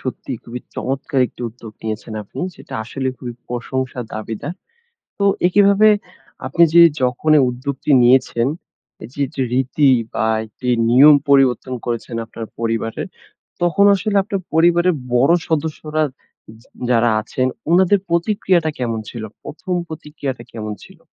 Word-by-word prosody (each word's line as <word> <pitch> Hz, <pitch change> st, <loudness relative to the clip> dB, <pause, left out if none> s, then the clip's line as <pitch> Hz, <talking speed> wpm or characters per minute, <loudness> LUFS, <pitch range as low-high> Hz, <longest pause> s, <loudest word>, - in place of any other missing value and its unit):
সত্যিই 130 Hz, -1 st, -5 dB
খুবই 120 Hz, +1 st, -7 dB
চমৎকার 135 Hz, 0 st, -2 dB
একটি -, -, -17 dB
উদ্যোগ 115 Hz, -1 st, -12 dB
নিয়েছেন 110 Hz, +1 st, -5 dB
আপনি। 100 Hz, -, -9 dB, 0.2 s
যেটা -, -, -11 dB
আসলেই 130 Hz, +2 st, -3 dB
খুবই 120 Hz, -2 st, -7 dB
প্রশংসা 125 Hz, +1 st, -3 dB
দাবীদার। 110 Hz, +8 st, -5 dB, 0.7 s
তো 200 Hz, -, 0 dB, 0.2 s
একইভাবে 200 Hz, +3 st, +5 dB, 0.6 s
আপনি 170 Hz, +6 st, +2 dB
যে 170 Hz, -, +9 dB, 0.2 s
যখনই 145 Hz, +4 st, +3 dB
উদ্যোগটি 135 Hz, +3 st, -4 dB
নিয়েছেন, 120 Hz, -1 st, +3 dB, 0.6 s
এই 110 Hz, -, -8 dB
যেটা 140 Hz, -1 st, -3 dB
রীতি 135 Hz, +2 st, +2 dB, 0.2 s
বা 110 Hz, -, 0 dB, 0.2 s
একটি 125 Hz, +4 st, -8 dB, 0.2 s
নিয়ম 145 Hz, +5 st, +8 dB
পরিবর্তন 130 Hz, -2 st, +3 dB
করেছেন 120 Hz, -1 st, -4 dB
আপনার 115 Hz, 0 st, -8 dB
পরিবারের, 115 Hz, -1 st, -2 dB, 0.6 s
তখন 185 Hz, +4 st, +3 dB
আসলে 205 Hz, +1 st, -1 dB
আপনার 195 Hz, -1 st, -3 dB
পরিবারের 175 Hz, +2 st, +4 dB, 0.2 s
বড় 135 Hz, +7 st, +4 dB, 0.2 s
সদস্যরা 155 Hz, 0 st, -1 dB, 0.6 s
যা -, -, -26 dB, 0.2 s
যারা 120 Hz, -1 st, +3 dB
আছেন 130 Hz, +4 st, -2 dB, 0.2 s
উনাদের 190 Hz, +3 st, +4 dB
প্রতিক্রিয়াটা 170 Hz, -2 st, +1 dB
কেমন 115 Hz, -3 st, -2 dB
ছিল? 115 Hz, -2 st, -7 dB, 0.2 s
১ম 180 Hz, +4 st, -5 dB
প্রতিক্রিয়াটা 150 Hz, -5 st, -6 dB
কেমন 110 Hz, -2 st, -5 dB
ছিল? 190 Hz, -2 st, -17 dB
135 Hz, 130 wpm, -19 LUFS, 120-170 Hz, 0.7 s, যে